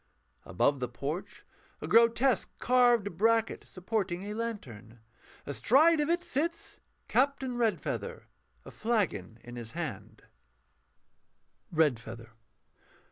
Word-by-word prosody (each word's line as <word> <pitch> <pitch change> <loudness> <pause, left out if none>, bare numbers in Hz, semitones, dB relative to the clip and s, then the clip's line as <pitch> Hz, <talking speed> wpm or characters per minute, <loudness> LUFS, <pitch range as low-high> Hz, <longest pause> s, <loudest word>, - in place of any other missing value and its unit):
_ - - -9
_Above 140 +10 +2
the 125 -1 -3
porch 150 - -6 0.3
a - - -6
grotesque 235 0 +4
carved 240 -7 +3
bracket, 225 +1 +2
supporting 185 -1 -3
a 205 +1 -5
lantern. 125 - -6 0.5
Astride 295 - +4
of 295 +1 0
it 345 +1 +1
sits 335 0 -3 0.3
CAPTAIN 265 -1 +1
REDFEATHER, 240 - -2 0.4
a - - -10
flagon 200 - -1
in 120 0 -9
his 115 -1 -7
hand_. 110 - -6 1.5
REDFEATHER. 120 -7 0
205 Hz, 105 wpm, -30 LUFS, -, 1.5 s, grotesque